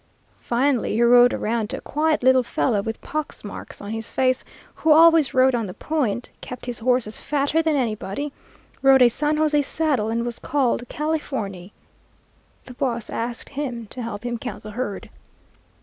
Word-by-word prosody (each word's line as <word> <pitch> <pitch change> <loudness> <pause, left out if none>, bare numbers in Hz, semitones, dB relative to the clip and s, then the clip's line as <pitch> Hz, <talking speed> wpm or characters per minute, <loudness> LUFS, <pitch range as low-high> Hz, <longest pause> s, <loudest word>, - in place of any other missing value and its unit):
Finally 250 +1 0
he 225 - +1
rode 245 +1 +7
around 220 -1 -1
to - - -3
a - - -9
quiet 305 -1 0
little 260 0 +5
fellow, 235 -3 0
with 225 +2 -5
pox 305 0 -5
marks 205 - -9
on 205 - -7
his 225 0 -4
face, 255 -1 +1 0.3
who 315 - +1
always 320 -2 +6
rode 260 0 +5
on 230 -3 -1
the 180 - -8
point, 250 -7 -2
kept 250 - -8
his 245 -2 -4
horses 245 -2 +1
fatter 290 +2 0
than 320 -2 +1
anybody, 245 +2 -2 0.5
rode 270 -1 +6
a 245 - +7
San 300 +5 0
José 300 -1 +2
saddle, 280 -8 0
and 230 +1 -1
was 240 -1 -4
called 250 -4 0
Californy. 260 - -3 0.9
The 250 - -10
boss 240 -4 -2
asked 235 +1 -3
him 260 -5 -4
to 255 - -4
help 225 -1 -6
him 240 -1 -3
count 250 - -7
the 215 - -8
herd. 210 -3 -4
250 Hz, 175 wpm, -23 LUFS, 225-290 Hz, 0.9 s, rode